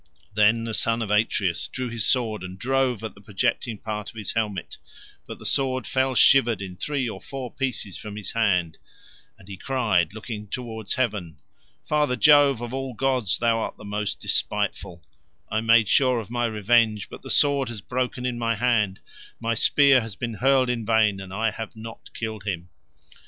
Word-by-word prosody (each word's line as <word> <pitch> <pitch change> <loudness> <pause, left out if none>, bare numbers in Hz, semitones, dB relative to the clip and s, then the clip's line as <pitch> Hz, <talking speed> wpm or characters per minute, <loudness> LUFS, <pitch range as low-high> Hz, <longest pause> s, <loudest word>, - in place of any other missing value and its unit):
Then 110 +2 +3
the 115 -1 -4
son 115 +2 +1
of 105 - -4
Atreus 105 -4 +1
drew 130 0 -4
his 115 -2 -2
sword, 115 -5 +1
and 95 0 -8
drove 130 -1 0
at 110 - -5
the 100 - -17
projecting 110 +3 -1
part 105 -1 -5
of - - -15
his 105 -3 -3
helmet, 105 -5 -3 0.5
but - - -7
the - - -13
sword 130 -1 0
fell 130 0 0
shivered 120 -5 +5
in 95 -2 -7
three 135 +5 -2
or 95 -4 -6
four 135 -3 -7
pieces 125 -8 -2
from 105 -1 -8
his 105 -2 -5
hand, 90 -8 +1 0.6
and 95 - -18
he 100 -2 -8
cried, 105 - +1
looking 110 -1 -7
towards 110 -1 -5
Heaven, 105 -10 -2 0.5
"Father 150 -4 +1
Jove, 140 +1 +5
of 120 0 -5
all 135 -2 -4
gods 130 -6 +1
thou 115 -1 +2
art - - -4
the - - -12
most 105 0 -3
despiteful; 85 -1 -1 0.5
I 110 - +1
made 115 -1 +5
sure 130 0 +3
of 110 0 -8
my 120 -1 0
revenge, 110 0 +2
but - - -11
the - - -10
sword 140 -3 +3
has 115 -4 -7
broken 125 +2 -3
in 125 -1 -2
my 115 -1 0
hand, 105 -4 +1 0.4
my 115 0 -1
spear 135 +3 +5
has 110 -3 -6
been 120 0 -4
hurled 130 +3 +3
in 120 -2 -3
vain, 110 -3 +2
and 95 -1 -9
I 110 +3 0
have 110 0 -7
not 110 +1 -10
killed 110 -3 -5
him." 90 -4 -4
115 Hz, 190 wpm, -24 LUFS, 105-125 Hz, 0.6 s, shivered